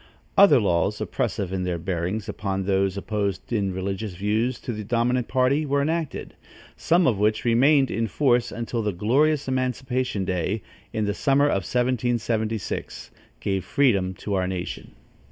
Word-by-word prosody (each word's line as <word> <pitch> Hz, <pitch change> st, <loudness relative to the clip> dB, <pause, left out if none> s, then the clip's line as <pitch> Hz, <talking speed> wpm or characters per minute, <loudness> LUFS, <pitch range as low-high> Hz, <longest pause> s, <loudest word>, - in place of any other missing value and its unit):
Other 200 Hz, -9 st, +7 dB
laws 85 Hz, -6 st, +1 dB
oppressive 95 Hz, -2 st, -2 dB
in 95 Hz, -, -1 dB
their 90 Hz, -1 st, -1 dB
bearings 90 Hz, +4 st, -3 dB
upon 95 Hz, -1 st, -3 dB
those 95 Hz, 0 st, +1 dB
opposed 100 Hz, 0 st, -3 dB
in 100 Hz, -4 st, 0 dB
religious 95 Hz, +1 st, -4 dB
views 110 Hz, +6 st, 0 dB
to 120 Hz, -, -4 dB
the 105 Hz, 0 st, -5 dB
dominant 120 Hz, +3 st, 0 dB
party 130 Hz, +3 st, +2 dB
were 140 Hz, -1 st, 0 dB
enacted, 160 Hz, 0 st, -3 dB, 0.4 s
some 170 Hz, +1 st, +2 dB
of 110 Hz, -6 st, +2 dB
which 110 Hz, +2 st, +1 dB
remained 135 Hz, +3 st, +4 dB
in 115 Hz, 0 st, -1 dB
force 120 Hz, 0 st, +2 dB
until 115 Hz, 0 st, -3 dB
the 105 Hz, -2 st, -1 dB
glorious 140 Hz, -, +2 dB
emancipation 130 Hz, -4 st, -1 dB
day, 95 Hz, +3 st, -1 dB, 0.3 s
in 110 Hz, -1 st, -1 dB
the 100 Hz, -, 0 dB
summer 140 Hz, +6 st, +2 dB
of 95 Hz, -10 st, 0 dB
1776, 120 Hz, -3 st, -1 dB, 0.3 s
gave 95 Hz, -2 st, -1 dB
freedom 95 Hz, -5 st, +2 dB
to 100 Hz, +2 st, -5 dB
our 95 Hz, -1 st, +1 dB
nation. 90 Hz, -1 st, -5 dB
110 Hz, 155 wpm, -24 LUFS, 95-130 Hz, 0.4 s, Other